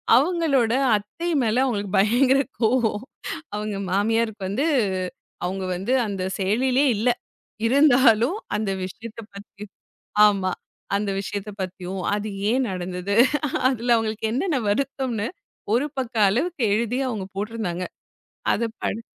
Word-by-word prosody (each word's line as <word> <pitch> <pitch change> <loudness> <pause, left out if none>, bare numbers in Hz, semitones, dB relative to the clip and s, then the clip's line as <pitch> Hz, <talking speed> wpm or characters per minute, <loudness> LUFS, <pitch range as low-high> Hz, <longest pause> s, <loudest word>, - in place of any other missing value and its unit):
அவங்களோட 280 -6 +3 0.2
அத்தை 270 +12 -5
மேல 230 +3 +2
அவங்களுக்கு 205 -7 -1
பயங்கர 255 +6 +4 0.2
கோபம். 225 -1 +2 0.5
அவுங்க 210 -1 -3
மாமியாருக்கு 220 +1 +1
வந்து 260 +10 0 0.8
அவுங்க 190 +1 -3
வந்து 195 +8 -1
அந்த 195 -2 -4 0.2
செயலிலே 250 +8 +2
இல்ல. 235 +4 +2 0.6
இருந்தாலும் 260 - +5 0.2
அந்த 210 -2 -1 0.2
விஷயத்தப் 225 +3 -9
பத்தி 205 0 -11 0.6
ஆமா. 195 -3 +1 0.4
அந்த 200 -1 -1
விஷயத்தப் 200 +1 -5
பத்தியும், 185 0 -4
அது 210 +1 -2 0.2
ஏன் 255 +1 +2
நடந்தது? 180 +2 -3 0.5
அதுல 240 -2 +2
அவங்களுக்கு 220 -1 -2
என்னென்ன 290 +2 0
வருத்தம்ன்னு 245 -1 -1 0.5
ஒரு 270 +5 +2
பக்க 250 -2 -3
அளவுக்கு 280 - -1
எழுதி 235 +3 0
அவுங்க 205 -6 -3
போட்டுருந்தாங்க. 205 -4 -3 0.7
அதப் 230 0 -2
படி 225 - -2
225 Hz, 115 wpm, -24 LUFS, 200-255 Hz, 0.8 s, இருந்தாலும்